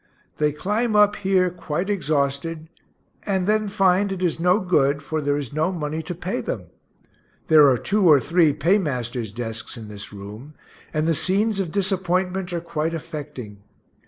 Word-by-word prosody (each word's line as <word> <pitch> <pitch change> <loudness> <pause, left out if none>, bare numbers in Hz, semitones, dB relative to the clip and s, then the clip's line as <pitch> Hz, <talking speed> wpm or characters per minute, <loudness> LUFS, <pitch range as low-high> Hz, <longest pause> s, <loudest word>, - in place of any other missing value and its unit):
They 150 -1 +2
climb 210 +9 -1
up 210 0 +5
here, 190 -2 +2
quite 175 0 -3
exhausted, 155 -3 -1 0.5
and 190 -3 -1
then 215 +1 +1
find 195 0 +2
it 185 -1 -3
is 170 -2 0
no 180 +4 +3
good, 145 -7 +1
for 155 +2 -2
there 145 0 0
is 140 -4 -5
no 155 +4 +1
money 160 -2 -3
to 170 +2 -6
pay 180 +3 -3
them; - - -5 0.8
there 150 -3 +7
are 130 - +3
two 200 - +1
or 150 -3 +7
three 165 +2 +3
paymasters' 140 - 0
desks 115 +2 -6
in 110 -2 -9
this 105 0 -8
room, 105 +8 -10 0.4
and 155 +1 0
the 165 - +3
scenes 200 +6 +1
of 180 -5 -2
disappointment 185 -1 0
are 170 -1 -2
quite 165 -1 -2
affecting. 150 - -7
165 Hz, 165 wpm, -23 LUFS, 145-190 Hz, 0.8 s, there